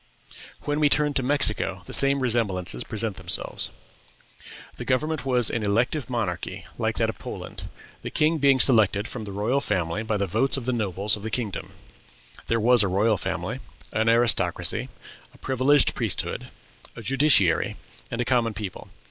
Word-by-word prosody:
When 145 +1 -2
we 150 -1 +4
turn 150 0 +3
to 135 - +2
Mexico, 110 -8 0
the - - -9
same 140 0 +4
resemblances 100 - -1
present 110 -2 -4
themselves. 90 -1 -1 1.1
The - - -5
government 145 +1 -1
was 125 -3 +3
an 115 - -2
elective 120 +8 0
monarchy, 110 -8 -3
like - - -1
that - - +1
of - - -20
Poland, - - -7 0.3
the - - -5
king 155 +1 +1
being 135 -2 +4
selected 110 -5 +4
from 110 -3 -7
the 100 - -7
royal 110 +8 0
family 85 -1 -1
by 110 -1 -1
the 100 - 0
votes 115 +10 +1
of 130 - -5
the 130 - 0
nobles 105 -2 +1
of 105 - -10
the 110 - -5
kingdom. 110 -3 -4 0.7
There 115 - +1
was 120 +1 +5
a 100 - +2
royal 100 +3 +2
family, - - -4 0.3
an 110 +1 +1
aristocracy, 115 0 +2 0.5
a - - -17
privileged 135 +2 +2
priesthood, - - -2 0.5
a 115 - -9
judiciary, 130 - +3 0.3
and 115 - -5
a - - -1
common 115 -4 +1
people. 100 -4 -7
115 Hz, 165 wpm, -25 LUFS, 100-130 Hz, 1.1 s, was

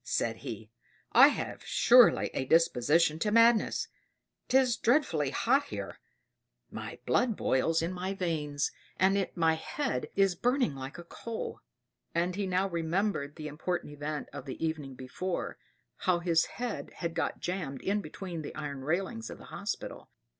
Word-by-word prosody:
sighed - - -1
he. - - -7 0.4
"I - - +9
have - - -3
surely 245 -1 +5
a 130 - -1
disposition 155 +1 +3
to 210 - +1
madness 230 0 +4 0.6
'tis 255 -2 +4
dreadfully 225 - +2
hot 270 - +2
here; - - -6 0.7
my - - -6
blood 240 -3 +2
boils 160 +5 +2
in 170 +2 -2
my 185 +2 -3
veins 150 -6 -1 0.3
and 195 0 +3
my 165 -2 +3
head 160 - -2
is 195 -2 +4
burning 245 - +1
like 135 +3 -7
a 175 - -8
coal." 225 +6 -6 0.6
And 175 +2 +1
he 200 -1 -1
now 185 +1 +1
remembered 170 -3 -1
the 155 -2 -6
important 150 +1 -3
event 145 +1 -4
of - - -7
the 135 +4 -4
evening 150 -4 -4
before, 150 +9 -4 0.4
how 185 -2 +2
his 170 -1 +2
head 245 -1 -4
had 170 -1 -3
got 165 - -2
jammed 170 -7 -4
in 205 +2 +1
between 180 -5 -6
the 150 - -7
iron 145 -3 -5
railings 155 -7 -2
of - - -8
the - - -13
hospital. - - -5
170 Hz, 155 wpm, -30 LUFS, 150-195 Hz, 0.7 s, I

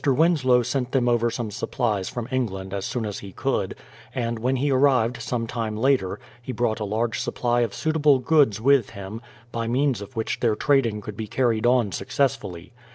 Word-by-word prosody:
Winslow 135 -3 +3
sent 125 +1 -2
them 130 -3 +2
over 120 -1 +3
some 115 -2 -4
supplies 105 -3 -1
from 120 -2 -5
England 95 -7 -2
as 100 -1 -3
soon 120 -3 -2
as 105 -2 -4
he 100 - -9
could, - - -1 0.4
and 115 -2 -2
when 130 +3 +1
he 140 +2 +1
arrived 130 -3 +3
some 115 0 -2
time 115 -2 -3
later 130 -5 +1 0.2
he 125 - -5
brought 120 -3 0
a 105 - -2
large 110 +3 -1
supply 120 0 0
of 115 -3 0
suitable 150 -3 +3
goods 130 -5 +3
with 135 0 +4
him, 100 +3 -7 0.3
by 115 -1 -2
means 130 0 +1
of 100 +6 -10
which 110 -1 -2
their 115 -3 +2
trading 120 -6 +2
could 105 0 -7
be 110 +1 -5
carried 120 0 +1
on 120 -5 +3
successfully. 95 - -2
120 Hz, 190 wpm, -24 LUFS, 110-130 Hz, 0.4 s, with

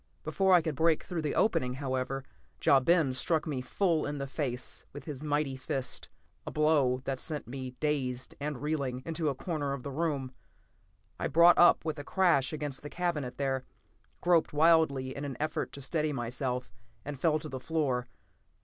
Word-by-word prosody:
Before 190 -1 +1
I 175 -3 +6
could 160 -2 -1
break 160 +2 +2
through 175 -3 -3
the 150 -2 -2
opening, 125 - +2
however, 130 0 -2 0.4
Ja 140 - +7
Ben 155 -1 +3
struck 160 +4 0
me 145 -5 -2
full 165 +5 +1
in 145 0 -3
the 140 - -3
face 130 -3 -3
with 145 - -8
his 145 -2 -6
mighty 145 -2 0
fist; 130 0 -3 0.3
a - - -5
blow 145 -5 +2
that 135 -1 -2
sent 150 -7 -4
me, 130 0 -6
dazed 130 -5 -1
and 145 -2 -4
reeling, 140 -4 -2
into 160 -1 -1
a 140 - -2
corner 145 -2 -2
of 135 -3 -6
the 140 - -5
room. 140 -3 -1 0.9
I - - 0
brought 170 +4 +6
up 175 -1 +6
with 155 -2 -2
a - - -5
crash 170 -6 +2
against 145 -3 -4
the 145 - -7
cabinet 150 -8 -2
there, 135 -2 -1 0.6
groped 170 -4 +3
wildly 150 -4 +3
in 140 - -5
an 135 -3 -4
effort 155 +1 -2
to 140 - -7
steady 155 +2 0
myself, 125 -2 -3 0.3
and 145 -2 -5
fell 155 0 +3
to 155 - -7
the 130 - -5
floor. 130 -5 -1
145 Hz, 185 wpm, -30 LUFS, 130-160 Hz, 0.9 s, Ja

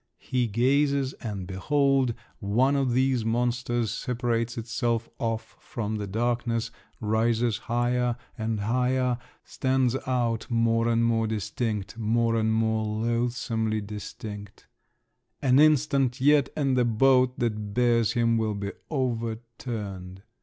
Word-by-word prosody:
He 125 -2 -1
gazes, 135 +4 +2
and 105 -6 -4
behold, 135 +5 +1 0.2
one 120 +7 +2
of 135 -3 +1
these 130 -1 +2
monsters 120 0 0
separates 120 -2 -2
itself 115 0 -1
off 115 -1 -3
from 110 -2 -4
the 105 -1 -4
darkness, 115 +1 -1 0.3
rises 115 +1 +1
higher 120 0 0 0.2
and 110 -2 -2
higher, 125 +2 +1 0.2
stands 130 -1 0
out 120 -3 0
more 115 -1 +2
and 115 0 +2
more 115 -1 +2
distinct, 105 0 -3
more 115 +1 +1
and 110 -1 +1
more 110 0 +1
loathsomely 115 0 -1
distinct…. 105 0 -8 0.7
An 130 0 +4
instant 140 -4 +3
yet, 140 0 +4
and 135 -3 +1
the 125 - +3
boat 125 +2 +3
that 105 -3 -2
bears 120 -2 +3
him 115 -2 +2
will 110 -1 -1
be 100 0 -4 0.2
overturned! 115 - -4
115 Hz, 120 wpm, -27 LUFS, 110-125 Hz, 0.7 s, An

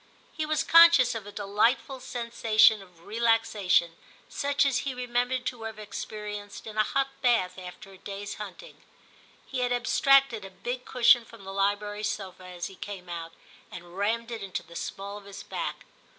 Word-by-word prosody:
He 310 -1 -3
was 310 0 +1
conscious 330 -7 +7
of 220 -3 -6
a - - -8
delightful 215 +7 +1
sensation 230 -3 +3
of 180 -3 -18
relaxation, 215 -6 +2 0.3
such 285 0 +1
as 265 -3 +2
he 270 -2 -3
remem 245 0 0
bered 255 -1 -2
to 245 -3 -4
have 225 -1 -6
experienced 210 0 -7
in 215 -1 -8
a 215 - +4
hot 275 +5 0
bath 190 -7 +2
after 180 +1 -10
a 190 - -15
day's 200 +1 -6
hunting; 210 - -10 0.6
he 265 - -4
had 245 0 0
abstracted 245 -1 +3
a 195 - -8
big 240 +7 -5
cushion 240 -1 +5
from 225 -2 -14
the 195 0 -7
library 205 +1 -1
sofa 190 -3 -4
as 180 -1 -6
he 195 - -8
came 190 -3 -8
out, 165 -1 -6 0.4
and 175 0 -11
rammed 230 +4 -1
it 230 -2 -5
into 195 -2 -4
the 170 - -15
small 200 +3 -5
of 200 - -18
his 200 -1 -9
back. - - -5
215 Hz, 180 wpm, -28 LUFS, 195-245 Hz, 0.6 s, conscious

